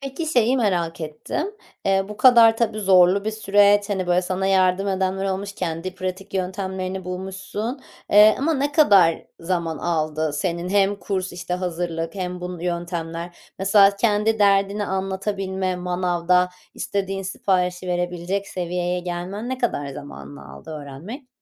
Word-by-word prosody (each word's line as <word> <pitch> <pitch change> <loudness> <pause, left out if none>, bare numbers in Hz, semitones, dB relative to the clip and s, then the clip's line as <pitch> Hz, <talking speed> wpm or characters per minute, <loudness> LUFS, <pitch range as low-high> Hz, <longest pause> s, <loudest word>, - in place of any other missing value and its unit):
Peki, 275 +4 -5
şeyi 250 -4 +3
merak 175 -8 0
ettim. 155 - -4 0.4
Eee, 195 0 +2
bu 210 - -8
kadar 230 -1 +7
tabii 225 -2 -1
zorlu 190 0 +5
bir 220 - 0
süreç. 205 -1 +3
Hani, 190 -2 -1
böyle 180 +1 +2
sana 185 +1 -2
yardım 190 0 +2
edenler 190 0 -1
olmuş, 195 +1 -3
kendi 180 -1 -4
pratik 190 +1 -6
yöntemlerini 190 0 -3
bulmuşsun. 195 +7 -5 0.3
Eee, 210 +1 +7
ama 315 +4 +1
ne 285 +1 -1
kadar 200 - +5 0.2
zaman 165 -2 -2
aldı 155 -2 -1
senin, 170 +3 -2
hem 200 +1 +2
kurs, 190 -2 -3
işte, 175 0 -4
hazırlık 170 -2 -3
hem 180 -2 -4
bun 180 0 -6
yöntemler? 170 -1 -4 0.2
Mesela 200 +1 +5
kendi 215 +1 +1
derdini 200 0 +3
anlatabilme, 190 -1 -2
manavda 180 0 +1 0.3
istediğin 195 -1 -3
siparişi 185 -1 -1
verebilecek 175 +2 -2
seviyeye 180 0 -2
gelmen 180 +6 -5
ne 260 - -3
kadar 185 - -1
zamanını 70 - -10
aldı 70 - -11
öğrenmek? 155 - -8
185 Hz, 140 wpm, -22 LUFS, 175-200 Hz, 0.4 s, kadar